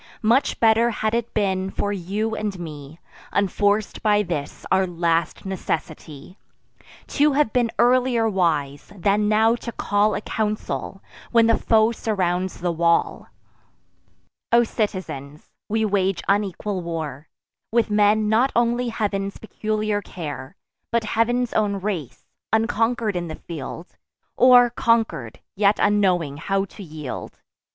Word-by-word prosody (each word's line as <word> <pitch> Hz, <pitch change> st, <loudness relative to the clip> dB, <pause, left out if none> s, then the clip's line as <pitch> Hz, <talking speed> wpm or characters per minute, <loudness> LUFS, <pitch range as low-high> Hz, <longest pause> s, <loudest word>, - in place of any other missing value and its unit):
Much 240 Hz, +6 st, +2 dB
better 225 Hz, +1 st, +4 dB
had 215 Hz, -1 st, -2 dB
it 235 Hz, 0 st, -1 dB
been 190 Hz, -3 st, 0 dB
for 205 Hz, +1 st, -2 dB
you 205 Hz, +4 st, -2 dB
and 210 Hz, -3 st, -3 dB
me, 155 Hz, -1 st, -9 dB, 0.3 s
Unforc'd 205 Hz, +1 st, +1 dB
by 210 Hz, -1 st, +3 dB
this 160 Hz, -6 st, -5 dB
our 190 Hz, 0 st, +3 dB
last 170 Hz, -1 st, -1 dB
necessity, 165 Hz, -3 st, -5 dB, 0.7 s
To 295 Hz, 0 st, +3 dB
have 275 Hz, -6 st, +1 dB
been 240 Hz, -2 st, +2 dB
earlier 245 Hz, -2 st, +3 dB
wise, 155 Hz, -8 st, -1 dB
than 205 Hz, +3 st, +2 dB
now 220 Hz, +2 st, +4 dB
to 235 Hz, -, -6 dB
call 210 Hz, -1 st, +1 dB
A -, -, -3 dB
council, 210 Hz, -2 st, -3 dB, 0.3 s
when 230 Hz, -1 st, +5 dB
the 230 Hz, 0 st, +4 dB
foe 220 Hz, 0 st, +3 dB
surrounds 185 Hz, -6 st, -2 dB
the 175 Hz, -1 st, 0 dB
wall. 170 Hz, 0 st, +1 dB, 1.2 s
O 235 Hz, 0 st, +6 dB
citizens, 185 Hz, -, -4 dB, 0.2 s
we 220 Hz, +1 st, +1 dB
wage 195 Hz, -2 st, 0 dB
unequal 200 Hz, -1 st, 0 dB
war, 160 Hz, -4 st, -5 dB, 0.4 s
With 230 Hz, -1 st, +1 dB
men 210 Hz, +1 st, +3 dB
not 230 Hz, +5 st, +3 dB
only 240 Hz, +1 st, +1 dB
Heav'n's 200 Hz, -3 st, -2 dB
peculiar 215 Hz, -1 st, -2 dB
care, 150 Hz, -5 st, -7 dB, 0.4 s
But 235 Hz, -1 st, +1 dB
Heav'n's 240 Hz, +3 st, 0 dB
own 205 Hz, -2 st, +1 dB
race; 190 Hz, -, -4 dB, 0.3 s
unconquer'd 225 Hz, -1 st, +1 dB
in 175 Hz, -1 st, -2 dB
the 155 Hz, -, -6 dB
field, 165 Hz, +2 st, -8 dB, 0.4 s
Or, 245 Hz, -1 st, +6 dB
conquer'd, 225 Hz, -, 0 dB
yet 205 Hz, +1 st, +3 dB
unknowing 180 Hz, -8 st, +2 dB
how 195 Hz, +4 st, -1 dB
to 200 Hz, -, -13 dB
yield. 155 Hz, -6 st, -7 dB
205 Hz, 130 wpm, -23 LUFS, 175-225 Hz, 1.2 s, O